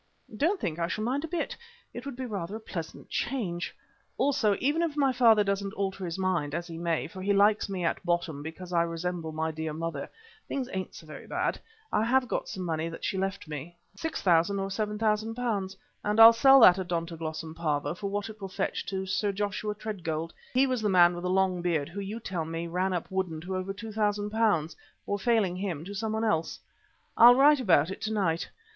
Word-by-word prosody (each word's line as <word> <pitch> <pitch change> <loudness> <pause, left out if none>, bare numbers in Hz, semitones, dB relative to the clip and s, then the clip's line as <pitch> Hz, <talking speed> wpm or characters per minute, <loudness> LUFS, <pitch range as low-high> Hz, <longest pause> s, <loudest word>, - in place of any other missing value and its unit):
"Don't 345 - +1
think 165 - -3
I 170 - 0
shall 215 +4 -3
mind 265 +6 -1
a - - -3
bit; 335 0 -3 0.4
it 245 +3 -7
would 280 - -5
be 260 +1 -5
rather 200 -4 -4
a - - -5
pleasant 170 -7 -7
change. 185 -10 -2 0.4
Also, 235 -7 +2
even 295 +5 +1
if 320 -3 -1
my 275 -2 +3
father 225 -4 +5
doesn't 200 +1 -2
alter 195 -1 -2
his 170 -1 -3
mind, 185 -6 0
as 170 0 -3
he 165 -2 -8
may, 170 -2 0
for 185 +3 -8
he 200 +2 +1
likes 205 +1 +3
me 185 -3 -2
at 165 - -1
bottom 170 -4 -1
because 175 +4 -8
I 170 - +4
resemble 170 0 -3
my 160 +1 -2
dear 160 0 -4
mother, 160 -2 -4 0.4
things 265 -3 -3
ain't 190 -1 -4
so - - -11
very 155 - -10
bad. - - -1 0.3
I 210 - +3
have 255 +2 +2
got - - -2
some 185 - -5
money 165 -1 -1
that 165 - -7
she - - -1
left 195 -2 -3
me, 155 +3 -7 0.2
£6,000 195 - +1
or 195 0 -2
£7,000, 215 0 -1 0.3
and 210 +1 0
I'll 225 +1 +11
sell 270 +3 +7
that 185 -4 +8
'Odontoglossum 165 -3 -4
Pavo' 150 -2 -1
for 200 +3 -4
what 205 +1 -2
it 220 -1 -11
will 195 - -5
fetch 190 +1 -2
to 190 -1 -3
Sir 190 +2 0
Joshua 205 +1 -2
Tredgold 165 -7 -4 0.2
he 260 +2 +5
was 255 -3 -1
the 210 - +1
man 175 -2 +6
with 175 - -6
the - - 0
long 185 -1 +2
beard 165 -4 0
who 190 +4 -7
you 200 +3 -5
tell 185 -7 -3
me 165 +1 -4
ran 180 +3 -1
up 175 -2 -2
Woodden 185 -4 -2
to 185 +3 -4
over 185 +1 -3
£2,000 210 -4 0 0.3
or 205 - -2
failing 200 -4 +2
him 175 -5 -3
to 200 - -7
someone 220 +2 -2
else. 165 -7 0 0.6
I'll 240 +2 +9
write 285 +2 +6
about 180 - +3
it - - -7
to 220 - -2
night. 175 -6 0
190 Hz, 210 wpm, -28 LUFS, 170-220 Hz, 0.6 s, I'll